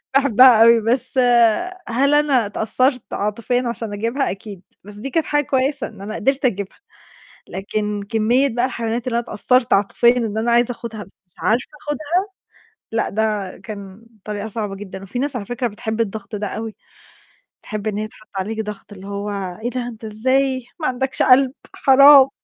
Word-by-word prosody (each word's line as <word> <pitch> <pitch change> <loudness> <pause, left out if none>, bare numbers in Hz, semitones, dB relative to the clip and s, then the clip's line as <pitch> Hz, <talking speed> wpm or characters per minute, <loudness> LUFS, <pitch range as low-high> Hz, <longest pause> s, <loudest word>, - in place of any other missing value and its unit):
باحبها 255 -3 +6
اوي 230 0 +7
بس 250 +4 -1 0.7
هل 275 +5 +2
أنا 280 -7 +3
اتأثرت 250 +5 0
عاطفيًا 235 +4 -1
عشان 225 -3 -4
أجيبها 230 +7 -1
أكيد، 195 -1 -8 0.2
بس 205 - -11
دي 235 +7 -6
كانت 325 +3 0
حاجة 295 0 +1
كويسة 270 +1 0
إن - - -13
أنا 210 +2 -6
قدرت 270 +4 0
أجيبها، 200 -5 -1 0.7
لكن 210 +1 -3
كمية 235 +6 +2
بقى 240 0 -1
الحيوانات 235 -1 -3
اللي 235 -1 0
أنا 235 - -2
اتأثرت 250 +3 +1
عاطفيًا 235 +5 +3
إن 220 -3 -1
أنا 235 +2 +1
عايزة 240 +1 +3
أخدها 230 -3 -7
بس - - -21 0.2
مش - - -38
عارفة 235 +4 0 0.2
أخدها، 295 0 -3 0.9
لأ 225 0 0
ده 210 -3 -2
كان 200 0 -10 0.2
طريقة 210 0 -4
صعبة 210 -2 -4
جدًا، 195 -1 -9
وفي 200 +6 -5
ناس 280 0 -2
على 205 -4 -4
فكرة 245 +2 -2
بتحب 220 +1 -3
الضغط 215 0 -4
ده 205 0 -3
أوي. 220 +1 -6 0.9
تحب 215 0 -5
إن 205 - -2
هي 215 +1 -2
تحط 215 0 -19
عليك 220 +4 -2
ضغط 205 0 -8
اللي 195 0 -11
هو 200 +1 -4 0.3
"إيه 240 - 0
ده 245 -1 -4
أنت 225 -2 -9
إزاي 260 +4 0
ما 310 - -1
عندكش 260 +1 -2
قلب 260 0 +5 0.2
حرام." 275 0 +7
230 Hz, 175 wpm, -20 LUFS, 210-255 Hz, 0.9 s, اوي